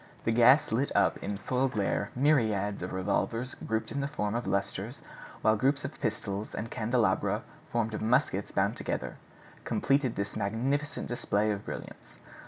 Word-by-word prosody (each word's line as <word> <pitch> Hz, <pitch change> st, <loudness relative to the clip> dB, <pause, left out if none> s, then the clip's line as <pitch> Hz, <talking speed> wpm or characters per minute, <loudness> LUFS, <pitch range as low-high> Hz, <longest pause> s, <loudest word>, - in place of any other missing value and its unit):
The 115 Hz, -, +1 dB
gas 120 Hz, +5 st, +6 dB
lit 130 Hz, +6 st, +1 dB
up 100 Hz, -, +4 dB
in 100 Hz, 0 st, -3 dB
full 130 Hz, +5 st, 0 dB
glare 105 Hz, -3 st, -1 dB
myriads 110 Hz, -8 st, +2 dB
of 90 Hz, -, -4 dB
revolvers 115 Hz, +6 st, -1 dB
grouped 110 Hz, 0 st, -3 dB
in 140 Hz, -, -1 dB
the 140 Hz, -, -1 dB
form 105 Hz, -8 st, -2 dB
of 120 Hz, -1 st, -2 dB
lustres, 100 Hz, 0 st, -2 dB, 0.4 s
while 110 Hz, 0 st, +5 dB
groups 135 Hz, +6 st, +1 dB
of -, -, -7 dB
pistols, 100 Hz, +2 st, -2 dB
and 115 Hz, +1 st, -4 dB
candelabra 115 Hz, 0 st, +1 dB, 0.3 s
formed 115 Hz, -2 st, 0 dB
of 110 Hz, -, -3 dB
muskets 110 Hz, -3 st, +1 dB
bound -, -, +1 dB
together, -, -, -3 dB, 0.5 s
completed 135 Hz, -3 st, +1 dB
this 100 Hz, 0 st, -3 dB
magnificent 135 Hz, +9 st, -1 dB
display 110 Hz, -3 st, 0 dB
of 100 Hz, 0 st, -3 dB
brilliance. -, -, -8 dB
115 Hz, 160 wpm, -30 LUFS, 105-130 Hz, 0.5 s, gas